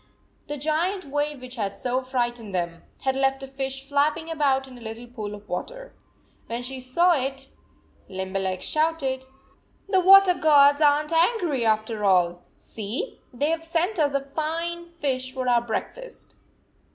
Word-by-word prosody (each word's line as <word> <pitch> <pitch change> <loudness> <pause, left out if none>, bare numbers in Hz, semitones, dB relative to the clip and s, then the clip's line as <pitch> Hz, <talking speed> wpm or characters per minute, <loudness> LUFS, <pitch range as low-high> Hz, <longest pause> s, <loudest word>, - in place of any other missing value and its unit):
The 295 - -4
giant 330 +7 -1
wave 290 -1 -2
which 255 0 -9
had 200 -3 -2
so 255 +1 -1
frightened 240 -5 -2
them, 170 -1 -2 0.2
had 265 0 0
left 270 0 +1
a - - -6
fish 270 0 -4
flapping 305 +3 +1
about 275 -4 +1
in 255 - -12
a 245 - -13
little 225 +1 -7
pool 215 -4 -6
of 205 0 -14
water. - - -6 0.5
When 235 +1 -4
she 260 +1 -5
saw 300 +8 +3
it, 270 -3 -1 0.6
Limberleg 190 0 -3
shouted: 305 -5 0 0.6
"The 390 -1 +3
water 385 0 +8
gods 290 -3 +5
aren 295 0 +4
t 330 - -2
angry, 335 - +2
after 220 0 0
all! 175 -3 +3 0.2
See, 225 - -5
they 285 +5 0
have 330 0 -2
sent 340 +4 -1
us 290 -2 +2
a 275 - +2
fine 330 +4 -3
fish 270 -6 -3
for 255 -1 -4
our 240 -1 +4
breakfast! 240 - -6
270 Hz, 160 wpm, -25 LUFS, 240-320 Hz, 0.6 s, water